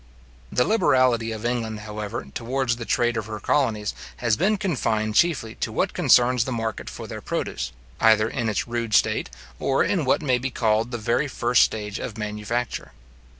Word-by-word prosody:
The 125 - +2
liberality 130 - +3
of 110 +1 -5
England, 115 -3 -2
however, 105 -5 -5
towards 120 0 -1
the 115 - -6
trade 120 -1 +2
of 110 -1 -3
her 110 -1 -5
colonies, 110 -5 0 0.2
has 115 -3 +1
been 205 - +2
confined 110 - 0
chiefly 130 -6 +2
to - - -2
what - - 0
concerns 125 -1 +4
the 130 - -3
market 115 -2 -3
for - - -8
their - - -7
produce, - - -3 0.3
either 110 -1 +5
in 115 -1 -2
its 105 - -1
rude 115 -3 -1
state, - - +2 0.3
or 135 - +2
in 180 -6 +1
what 135 +4 +2
may 130 -4 +2
be 130 +2 -2
called 110 -1 +1
the 120 - -3
very 120 +6 0
first 120 -2 +2
stage 105 -1 0
of 110 - -6
manufacture. 105 +3 -3
115 Hz, 180 wpm, -24 LUFS, 110-130 Hz, 0.3 s, either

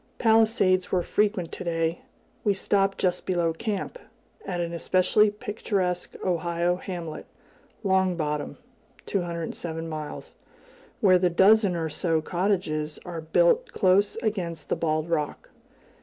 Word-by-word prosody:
Palisades 220 -5 +3
were 180 -2 +2
frequent 200 -5 0
to - - -6
day. 165 -1 -1 0.4
We 205 -2 +2
stopped 195 0 +1
just 180 -1 0
below 175 -3 +1
camp, 210 - -4 0.5
at 180 -2 -2
an 170 0 -2
especially 185 +5 +3
picturesque 200 -3 -3
Ohio 175 0 0
hamlet, 175 -4 -6 0.6
Long 190 -2 +2
Bottom 150 -2 -3 0.5
(207 170 -2 -3
miles), 155 -2 -7 0.7
where 185 -4 +6
the 180 0 +3
dozen 195 +2 +5
or 165 -1 -1
so 160 +1 0
cottages 160 -3 -1
are 170 -2 -5
built - - +2
close 195 +2 +3
against 175 -8 -3
the - - +1
bald 155 -1 -1
rock. 155 -3 -3
180 Hz, 125 wpm, -26 LUFS, 165-195 Hz, 0.7 s, where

